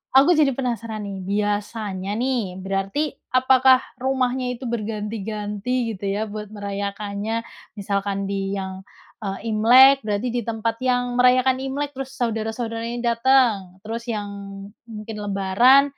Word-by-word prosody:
aku 280 +7 +7
jadi 295 -5 +3
penasaran, 230 -4 -3
nih, 200 -1 -5
biasanya, 205 -1 -2
nih, 235 -7 -1
berarti 195 +10 -1 0.2
apakah 260 0 +5 0.2
rumahnya 255 -1 0
itu 255 - -8
berganti-ganti 215 +1 -3
gitu, 195 - -7
ya, 210 - -1
buat 210 0 -6
merayakannya? 205 +2 -3 0.3
Misalkan 200 0 -2
di 195 0 -2
yang, 190 -1 -5 0.4
eee, 205 +2 -4
Imlek 260 +5 +7
berarti 210 +4 0
di 245 - 0
tempat 225 0 -2
yang 245 -1 +1
merayakan 255 +1 +4
Imlek 280 +2 -3
terus 270 0 -7
saudara-saudara 225 0 -2
ini 240 +1 -4
dateng, 235 -6 +3
terus 230 +1 -4
yang 210 -3 -2 0.6
mungkin 215 0 -7
lebaran 205 +7 +5
225 Hz, 130 wpm, -23 LUFS, 205-255 Hz, 0.6 s, aku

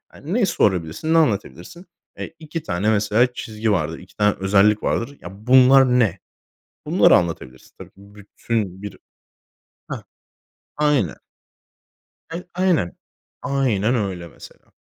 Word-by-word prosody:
yani, 165 +7 -7
ne 230 -3 +2
sorabilirsin, 95 - 0
ne 165 - +5
anlatabilirsin? 160 - -1 0.3
E, - - -5
2 160 -1 -8
tane, 95 +4 -1
mesela, 110 +4 +2
çizgi 110 -1 -3
vardır. 80 -3 -1
2 90 0 -17
tane 105 -1 +2
özellik 100 +2 +3
vardır. 140 +5 -2
"Ya 85 - -8 0.2
bunlar 130 +1 +7
ne?" 100 -6 +1 0.7
Bunları - - +5
anlatabilirsin 80 -7 -3
tabii - - -11
ki - - -41
bütün 100 0 -5
bir 105 - -8 0.9
Hah, - - -6 0.7
aynen. 145 - +1 1.1
Ay 170 +2 -6
aynen. 175 - 0 0.5
Aynen 125 -5 0
öyle 95 -6 -3
mesela. - - -16
105 Hz, 125 wpm, -21 LUFS, 95-140 Hz, 1.1 s, bunlar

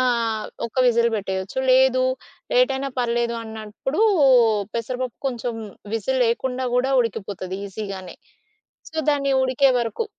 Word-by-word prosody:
ఆహ్, 230 -4 0 0.2
ఒక్క 230 - -17
విజిల్ 235 -1 +4
బెట్టేయొచ్చు. 190 +3 -4
లేదు 255 0 +4 0.5
లేటైనా 275 - +2
పర్లేదు 235 -1 0
అన్నప్పుడు 220 - -5 0.7
పెసరపప్పు 250 +1 -3
కొంచెం 245 -2 -3 0.4
విజిల్ 260 +4 -1
లేకుండా 250 +2 -1
గూడా 260 +2 +2
ఉడికిపోతది 195 -4 -4
ఈజీగానే. 195 -2 -7 0.7
సో, 320 - -11
దాని 275 -1 +1
ఉడికే 260 +1 +3
వరకు, 235 - -2
235 Hz, 110 wpm, -22 LUFS, 220-260 Hz, 0.7 s, విజిల్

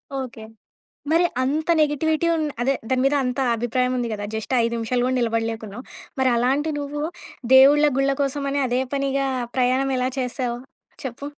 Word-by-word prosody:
Okay. 255 -4 -5 0.7
మరి 335 +2 +4 0.2
అంత 300 +4 -1
negativity 310 +2 +1
ఉం 325 - 0 0.2
అదే. 265 +3 +2 0.2
దాని 260 -1 +1
మీద 275 +2 +3
అంత 250 0 -2 0.2
అభిప్రాయం 250 +2 0
ఉంది 240 -1 -2
కదా! 205 -1 -4
జస్ట్ 220 +4 -4
5 230 0 0
నిమిషాలు 245 +2 -1
కూడా 255 +1 0
నిలబడలేకున్నావు. 225 -1 -2 0.4
మరి 260 -1 +3
అలాంటి 270 +6 +1
నువ్వు 290 +1 -4 0.5
దేవుళ్ళ 290 +3 +7
గుళ్ళ 275 0 +2
కోసం 280 0 -1
అనే 285 0 0
అదే 250 +1 0
పనిగా 275 0 0 0.3
ప్రయాణం 260 +2 +2
ఎలా 255 0 0
చేసావు? 250 -1 -2 0.5
చెప్పు. 260 +2 -6
260 Hz, 160 wpm, -23 LUFS, 240-280 Hz, 0.7 s, దేవుళ్ళ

